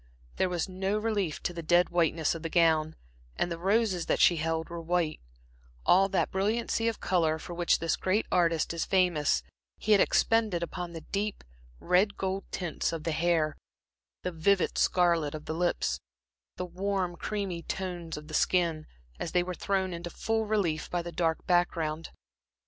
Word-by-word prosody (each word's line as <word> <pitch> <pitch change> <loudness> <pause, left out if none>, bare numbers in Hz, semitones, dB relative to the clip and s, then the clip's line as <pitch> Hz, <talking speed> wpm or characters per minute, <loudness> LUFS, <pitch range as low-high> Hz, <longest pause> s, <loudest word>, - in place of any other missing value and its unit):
There 185 - +2
was 175 0 -1
no 190 +2 -1
relief 210 -7 -1
to 175 - -1
the 170 - -5
dead 175 +2 +3
whiteness 165 -2 +1
of 165 - -6
the 165 - -3
gown, 160 -2 +3 0.4
and 175 - -1
the 165 - -4
roses 195 -1 +1
that - - +1
she 175 - +5
held 160 +1 -1
were 170 0 -6
white; 165 -2 0 0.7
all 195 +2 +5
that 190 - 0
brilliancy 225 +4 0
of 230 - -1
color, 160 -4 +1
for 175 - -8
which 175 0 +2
this 165 0 0
great 200 +4 +1
artist 170 -2 +2
is 165 - -1
famous, 180 -6 +2 0.3
he 215 - -2
had 205 - +7
expended 220 -7 +2
upon 175 0 -5
the 165 - -6
deep 205 +1 -2 0.4
red 185 +4 +2
gold 190 0 -2
tints 175 -4 -2
of 165 -2 -5
the 165 - -1
hair, 160 -2 +1 0.7
the 180 - -2
vivid 180 +3 +2
scarlet 170 -5 +2
of 155 - -8
the 155 - -3
lips, 175 +2 0 0.6
the 180 - -3
warm 185 0 -2
creamy 195 -2 -3
tones 175 -2 -4
of 150 0 -9
the 155 - -10
skin, 165 -3 +1 0.3
as 165 - -4
they 180 - +3
were 180 +1 -4
thrown 190 0 -1
into 170 0 -5
full 220 +4 -1
relief 185 -8 0
by 175 -1 -1
the 170 - -6
dark 165 -1 -1
background. 165 -3 0
175 Hz, 175 wpm, -29 LUFS, 165-190 Hz, 0.7 s, had